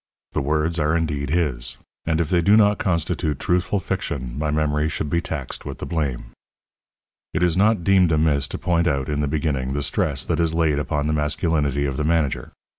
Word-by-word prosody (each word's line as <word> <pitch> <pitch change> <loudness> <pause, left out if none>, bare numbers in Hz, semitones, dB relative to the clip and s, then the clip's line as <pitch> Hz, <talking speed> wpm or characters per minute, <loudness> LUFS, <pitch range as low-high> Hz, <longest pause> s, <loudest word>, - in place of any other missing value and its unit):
The - - -1
words 75 +4 0
are 75 +2 +2
indeed 75 -4 -2
his; 70 -7 0 0.3
and 80 -1 +1
if 80 -3 -1
they 90 -2 +3
do 100 +5 +5
not 105 -1 +4
constitute 85 -4 -1
truthful 90 +3 +1
fiction 65 -8 -3
my 75 +1 -1
memory 75 0 +1
should 75 -2 -3
be 85 - +2
taxed 75 -6 -5
with - - -6
the - - -6
blame. 75 -7 -3 1.0
It 85 - +1
is 85 -2 +3
not 105 -1 +3
deemed 95 -3 +4
amiss 75 -3 +2
to - - -5
point 85 -1 +1
out, 70 -3 0
in 75 -1 -1
the 75 - 0
beginning, 70 -3 -1
the 70 0 -1
stress - - 0
that - - -1
is 80 -1 +1
laid 80 -3 +2
upon 75 +1 -1
the 75 - 0
masculinity 75 -2 0
of 70 -2 -2
the 75 - -1
manager. 80 -3 0
75 Hz, 200 wpm, -22 LUFS, 70-85 Hz, 1.0 s, do